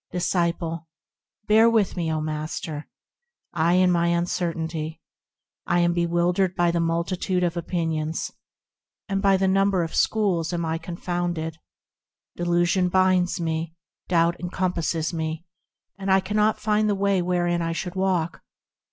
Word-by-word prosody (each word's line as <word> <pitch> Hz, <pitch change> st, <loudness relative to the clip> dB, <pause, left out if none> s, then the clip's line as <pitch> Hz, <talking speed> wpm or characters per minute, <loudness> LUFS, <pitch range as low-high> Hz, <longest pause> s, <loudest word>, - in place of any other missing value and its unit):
Disciple. 170 Hz, -2 st, -1 dB, 0.6 s
Bear 220 Hz, +2 st, +6 dB
with 220 Hz, -4 st, +2 dB
me, 170 Hz, -3 st, -1 dB
O 155 Hz, -1 st, -1 dB
Master! 155 Hz, 0 st, -4 dB, 0.7 s
in 175 Hz, +3 st, +4 dB
my 170 Hz, -1 st, +2 dB
uncertainty. 165 Hz, -2 st, -2 dB, 0.7 s
I 175 Hz, 0 st, +3 dB
am 175 Hz, 0 st, +2 dB
bewildered 175 Hz, +2 st, +1 dB
by 175 Hz, -1 st, +2 dB
the 170 Hz, -, 0 dB
multitude 170 Hz, +2 st, 0 dB
of 175 Hz, -1 st, 0 dB
opinions, 165 Hz, -2 st, -2 dB, 0.8 s
And 195 Hz, -2 st, -1 dB
by 195 Hz, -1 st, +4 dB
the 190 Hz, 0 st, +1 dB
number 195 Hz, -1 st, +2 dB
of 165 Hz, -, -5 dB
schools 185 Hz, -6 st, +1 dB
am 170 Hz, -1 st, -1 dB
I 160 Hz, 0 st, -1 dB
confounded; 170 Hz, -1 st, -3 dB, 0.8 s
Delusion 175 Hz, +1 st, +1 dB
blinds 185 Hz, 0 st, +2 dB
me, 165 Hz, 0 st, -2 dB, 0.3 s
doubt 170 Hz, -1 st, +2 dB
encompasses 175 Hz, -2 st, -1 dB
me, 160 Hz, 0 st, -3 dB, 0.5 s
And 195 Hz, 0 st, -3 dB
I 190 Hz, 0 st, +5 dB
cannot 210 Hz, +3 st, +1 dB
find 215 Hz, 0 st, +1 dB
the 205 Hz, -, +2 dB
way 195 Hz, -1 st, +1 dB
wherein 175 Hz, -1 st, 0 dB
I 165 Hz, 0 st, -1 dB
should 175 Hz, +1 st, -4 dB
walk. 185 Hz, -3 st, -1 dB
175 Hz, 135 wpm, -24 LUFS, 165-185 Hz, 0.8 s, Bear